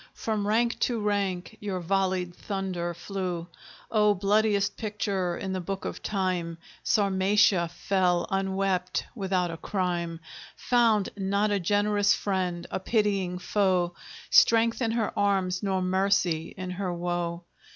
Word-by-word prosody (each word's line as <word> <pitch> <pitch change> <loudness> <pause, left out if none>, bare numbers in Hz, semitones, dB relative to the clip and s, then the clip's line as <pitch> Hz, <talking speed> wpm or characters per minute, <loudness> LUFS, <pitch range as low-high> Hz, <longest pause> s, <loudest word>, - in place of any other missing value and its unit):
From 215 -2 -2
rank 235 +3 +1
to 240 -2 0
rank 200 -1 -1
your 200 -3 -3
volleyed 185 0 0
thunder 185 -4 -3
flew; 175 0 -4 0.5
Oh, 210 -2 +4
bloodiest 205 +1 +2
picture 200 -4 -2
in 190 -1 -4
the 185 - -2
book 195 +2 -5
of - - -5
Time, 185 -4 -1 0.3
Sarmatia 195 -3 +3
fell, 180 0 +1
unwept, 190 -1 0
without 185 -5 -1
a 165 - -6
crime; 175 -3 -2 0.4
Found 230 -5 +2
not 200 +1 0
a 200 - +1
generous 205 +2 +2
friend, 180 -3 -2
a - - -1
pitying 195 -3 0
foe, 180 -2 +1 0.4
Strength 230 +2 +5
in 225 -2 +1
her 225 -3 -1
arms, 190 -2 +1
nor 190 -2 0
mercy 185 -3 +1
in 185 -1 -5
her 185 0 -3
woe! 175 0 -3
190 Hz, 130 wpm, -27 LUFS, 180-205 Hz, 0.5 s, Strength